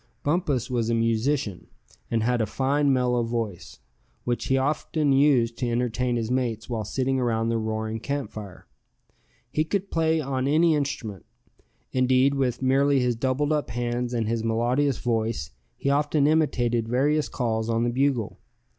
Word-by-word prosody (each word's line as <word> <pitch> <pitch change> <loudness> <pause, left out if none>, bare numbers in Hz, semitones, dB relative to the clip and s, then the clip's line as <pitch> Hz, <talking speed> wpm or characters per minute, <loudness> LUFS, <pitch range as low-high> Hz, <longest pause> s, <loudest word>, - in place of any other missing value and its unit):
Bumpus 145 -6 0
was 120 -3 -1
a 115 - +2
musician, 115 -1 0 0.4
and 115 -1 0
had 120 0 +1
a 110 - 0
fine 140 +5 +1
mellow 125 -2 +2
voice, 115 -6 -4 0.5
which 120 -1 -2
he 135 - +2
often 145 +1 0
used 135 -4 +3
to 125 - -1
entertain 120 +1 0
his 115 0 -2
mates 120 -4 -1
while 115 -3 -3
sitting 130 +5 -1
around 115 -2 0
the 115 0 0
roaring 110 0 -3
camp 140 +4 -3
fire. 100 -4 -9 0.9
He 155 - +1
could 195 +4 -3
play 160 -1 +2
on 135 -2 -1
any 160 +3 +4
instrument; 125 - -3 0.6
indeed, 130 +2 +3
with 135 -2 -1
merely 135 +1 +3
his 125 -1 +1
doubled 130 +5 0
up 150 -1 -1
hands, 120 +1 -2
and 115 -3 -1
his 115 0 -1
melodious 120 +5 +1
voice, 115 - -1 0.3
he 140 - 0
often 145 0 +2
imitated 120 -7 +1
various 145 +5 +1
calls 110 -2 -1
on 115 0 +1
the 120 - +1
bugle. 130 -4 0
125 Hz, 160 wpm, -25 LUFS, 115-140 Hz, 0.9 s, any